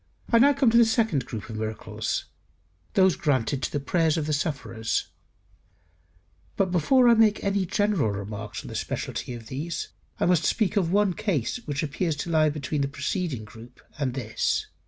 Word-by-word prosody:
I - - -12
come 230 -1 +6
now 285 +2 +7 0.2
to 235 - +4
the - - +8
second 220 - +1
group 110 -3 -6
of 110 -2 -6
miracles, 110 0 -3 0.7
those 190 -3 +5
granted 135 -2 0
to - - -2
the 145 - -1
prayers 165 +2 +1
of 155 - -1
the 150 - -1
sufferers. 140 -7 -2 1.5
But 190 -2 +1
before 245 - +4
I 235 - +8
make 220 -2 +3
any 195 -2 0
general 205 - +1
remarks 100 +1 -5
on - - -9
the - - -7
speciality 125 - -4
of 115 -1 -10
these, 150 +8 -4 0.3
I - - +2
must 175 -3 +3
speak 210 +3 +1
of 180 -5 +1
one 200 -1 +3
case 195 - -1
which 145 0 -2
appears 155 +2 -1
to 155 +4 -4
lie 155 -1 +4
between 150 0 -2
the 140 - +1
preceding 140 - -3
group 115 +3 -14 0.2
and 130 -3 -1
this. 120 -5 -1
155 Hz, 180 wpm, -26 LUFS, 130-195 Hz, 1.5 s, the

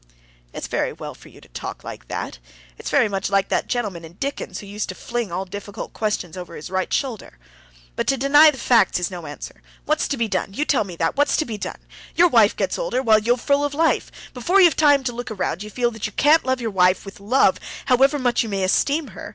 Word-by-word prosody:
"It's - - -6
very - - -1
well - - -8
for - - -16
you - - -17
to - - -17
talk - - -7
like - - -9
that; - - -5 0.4
it's - - -7
very - - +3
much 195 -1 -2
like 195 0 +1
that - - 0
gentleman 205 -9 -3
in 165 +1 -11
Dickens 275 +10 -4
who - - -8
used 205 +1 -5
to - - -5
fling 240 -5 -4
all 185 +3 -3
difficult 205 +2 -8
questions 205 -5 -2
over 180 -2 -8
his 155 +4 -8
right 185 0 -1
shoulder. 240 - -3 0.6
But - - -2
to 270 - +2
deny 290 +4 +7
the 290 - -3
facts 230 -8 +3
is 180 +1 -2
no 175 -4 -7
answer. 145 - -9 0.2
What's 305 0 +1
to 280 - -2
be 230 -1 0
done—you 200 +7 -2
tell 255 -9 +2
me 180 -3 -8
that, 165 0 -1
what's 290 0 +2
to 310 - 0
be 220 -5 -6
done? - - -5 0.4
Your 350 +1 +5
wife 225 -7 +4
gets - - -2
older, - - -1
while 220 -3 +5
you're 240 +3 +1
full 280 +3 +1
of 290 -1 -2
life. 325 +2 +1 0.2
Before 345 +11 +2
you've 350 -4 +6
time 290 -3 +4
to 245 -2 -2
look 245 +1 -6
round, 190 -4 -3
you 210 - -7
feel 240 +2 0
that 225 -1 -4
you 215 - -11
can't 305 +3 +4
love 260 0 0
your 230 -2 -3
wife 185 0 +3
with 195 +1 -10
love, 235 +7 +3 0.3
however 270 +3 +4
much 245 -3 +1
you 225 - -3
may 195 -2 -1
esteem 280 +10 +1
her. - - -9
225 Hz, 240 wpm, -22 LUFS, 195-275 Hz, 0.6 s, deny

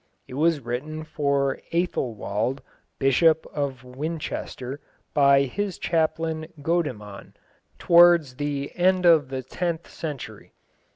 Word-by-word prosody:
It - - -11
was 155 +2 +2
written 140 +6 -4
for 140 -3 0
Æthelwold, 125 - -1 0.4
Bishop 155 +4 +3
of 140 -4 -3
Winchester, 135 -1 -5 0.3
by 140 -1 +5
his 190 +8 -3
chaplain 160 -1 -1 0.2
Godemann, 125 - -3 0.4
towards 170 -6 +5
the 145 -1 -3
end 185 0 +2
of 160 -6 +5
the 130 -1 -4
tenth 170 +5 -3
century. 150 -5 -7
145 Hz, 105 wpm, -25 LUFS, 130-165 Hz, 0.4 s, by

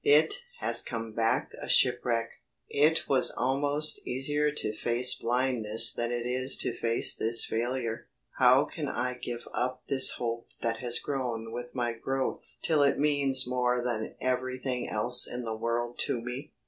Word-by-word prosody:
It 150 +2 +4 0.2
has - - +1
come 115 -2 -7
back 115 0 -2
a - - -8
shipwreck! 120 -2 +1 0.4
It 155 +3 0
was 135 -2 +4
almost 145 +4 -1
easier 145 +4 0
to 110 -7 -2
face 120 +3 +5
blindness 120 -2 +3
than 120 0 -4
it 120 -1 -5
is 130 +2 +2
to - - -1
face 115 0 +3
this 115 +1 +3
failure. 115 0 -5 0.3
How 130 +2 +4
can 150 -1 -7
I 125 -1 -4
give 120 -1 -9
up 125 +1 -4
this 130 -1 +7
hope 115 -1 -6
that 115 -1 -3
has 120 0 0
grown 120 -6 -5
with 120 +1 -9
my 120 -2 -3
growth 130 +3 -6
till 155 -3 +1
it 140 -1 +1
means 140 -3 +4
more 125 -1 -2
than 115 -3 -5
everything 130 0 -4
else 120 +3 +5
in 125 0 -6
the 110 -1 -5
world 120 +1 -5
to 120 - -3
me? 125 +4 -9
125 Hz, 160 wpm, -27 LUFS, 115-130 Hz, 0.4 s, this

